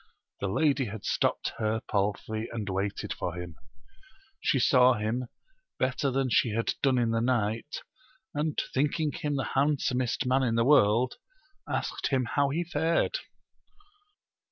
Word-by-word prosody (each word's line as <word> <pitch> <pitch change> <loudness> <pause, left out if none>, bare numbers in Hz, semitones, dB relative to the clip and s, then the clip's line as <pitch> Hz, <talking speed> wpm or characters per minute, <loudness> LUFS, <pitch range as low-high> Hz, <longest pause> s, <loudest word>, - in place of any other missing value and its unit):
The 100 - -2
lady 135 +6 +2
had 105 -1 -7
stopped - - 0
her 110 0 0
palfry, 105 +2 -1
and 110 -3 -4
waited 95 +1 -2
for 90 -1 -4
him. 90 -2 -7 0.8
She - - +1
saw 125 0 +5
him, 115 +4 -2 0.5
better 130 +2 0
than 130 -1 0
she 115 -1 +3
had 115 - 0
done 135 -2 +3
in 120 -2 +2
the 115 0 +1
night, 115 +2 -1 0.5
and 150 0 -1
thinking 150 +3 +1
him 145 0 -3
the 135 - -2
handsomest 135 -2 +1
man 130 +1 +2
in 120 -3 +1
the 115 0 +2
world, 125 -3 +4 0.5
asked - - -2
bim 130 -2 +1
how 140 +3 +1
he 165 +5 -1
fared 170 - 0
125 Hz, 145 wpm, -28 LUFS, 110-140 Hz, 0.8 s, saw